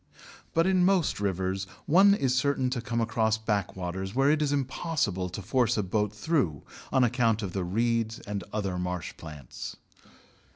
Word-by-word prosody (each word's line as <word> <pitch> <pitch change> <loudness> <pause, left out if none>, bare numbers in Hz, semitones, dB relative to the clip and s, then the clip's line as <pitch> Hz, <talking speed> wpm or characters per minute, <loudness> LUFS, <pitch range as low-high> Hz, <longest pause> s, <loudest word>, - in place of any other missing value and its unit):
But 165 +1 +4
in 185 -1 +3
most 185 - +2
rivers, 95 -1 -1 0.2
one 195 +5 +6
is 135 -9 +1
certain 130 -1 +1
to 125 -2 -2
come 115 0 -2
across 110 -1 +1
backwaters 95 -2 -3
where 135 +2 +4
it 155 0 +2
is 145 -2 +1
impossible 135 - -1
to 95 +3 -6
force 120 +2 +2
a 105 - +1
boat 105 +2 0
through 105 - 0 0.3
on 130 - +4
account 115 -3 +2
of 95 -3 -4
the 95 - -1
reeds 115 +4 0
and 100 -2 -4
other 95 -4 -2
marsh 90 -2 -3
plants. 75 -5 -8
110 Hz, 165 wpm, -28 LUFS, 95-135 Hz, 0.3 s, one